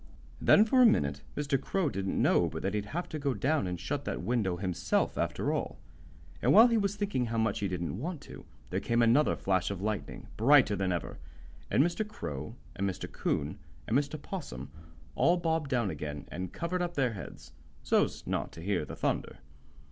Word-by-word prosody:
Then 210 - +6
for 255 +3 +4
a - - +8
minute 70 - +1 0.2
Mr. 140 -2 0
Crow 190 -4 0
didn't 95 -6 -2
know - - +3
but - - -6
that 95 - -1
he'd 105 -1 -2
have 175 +10 -3
to 155 - -4
go 140 -3 0
down 140 +3 +1
and 90 -1 -3
shut 145 -1 -3
that - - -3
window 105 -7 0
himself, 90 -2 0
after - - -1
all. - - -3 0.6
And - - +3
while 220 +3 +9
he 230 - +3
was 200 0 0
thinking 200 -12 -1
how 115 0 -3
much 110 -2 +1
he 100 - 0
didn't 90 +1 -3
want 165 +4 -4
to, - - -11 0.3
there - - 0
came 120 0 +2
another 125 +6 +4
flash 95 -2 0
of 100 -3 -4
lightning, 105 0 -4
brighter 125 -2 +5
than 95 -1 0
ever, 85 - -3 0.5
and 135 - +4
Mr. 175 +6 0
Crow 75 - -6 0.2
and 100 +1 0
Mr. 95 0 -6
'Coon 70 +1 -2 0.3
and 110 - 0
Mr. 145 +2 0
'Possum 140 - -7 0.4
all 175 +2 +3
bobbed 160 -4 0
down 120 -7 +1
again 75 -1 -5
and 90 +2 -5
covered 180 +2 -2
up 175 0 -2
their 125 -5 +1
heads, 95 - -10 0.3
so's - - +1
not - - -2
to 80 - -10
hear 90 -3 0
the - - -8
thunder. - - -2
115 Hz, 200 wpm, -30 LUFS, 95-155 Hz, 0.6 s, while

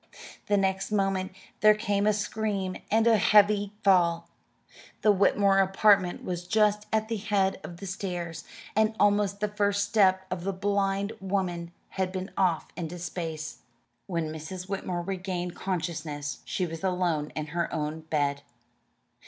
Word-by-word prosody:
The 205 - +3
next 190 +1 0
moment 195 -2 0 0.3
there 215 0 +6
came 205 -1 0
a 215 - +4
scream 205 -2 -2
and 220 +1 +3
a 230 -2 +5
heavy 205 0 +4
fall. 170 -3 +3 0.8
The 215 - +6
Whitmore 200 0 +3
apartment 195 -1 +3
was 175 -1 -4
just 210 0 +2
at 220 0 +1
the 225 0 -2
head 195 -2 0
of 170 - -8
the 195 - -8
stairs, 175 -3 -4 0.3
and 220 +1 +2
almost 205 -1 +2
the 210 - +2
first 205 -1 0
step 190 -3 +3
of 180 -2 -3
the 195 +1 -1
blind 200 +1 0
woman 185 -3 -2 0.2
had 190 -1 -2
been 190 +1 -5
off 175 -4 +1
into 175 0 -5
space. 165 -3 -5 0.5
When 165 -3 -2
Mrs. 175 +4 -7
Whitmore 185 -3 -3
regained 180 -1 -3
consciousness 155 -5 -3
she 185 - -1
was 165 0 -7
alone 180 -5 0
in 155 -1 -3
her 170 0 -1
own 155 0 -2
bed. 145 -3 -1
190 Hz, 150 wpm, -28 LUFS, 175-205 Hz, 0.8 s, there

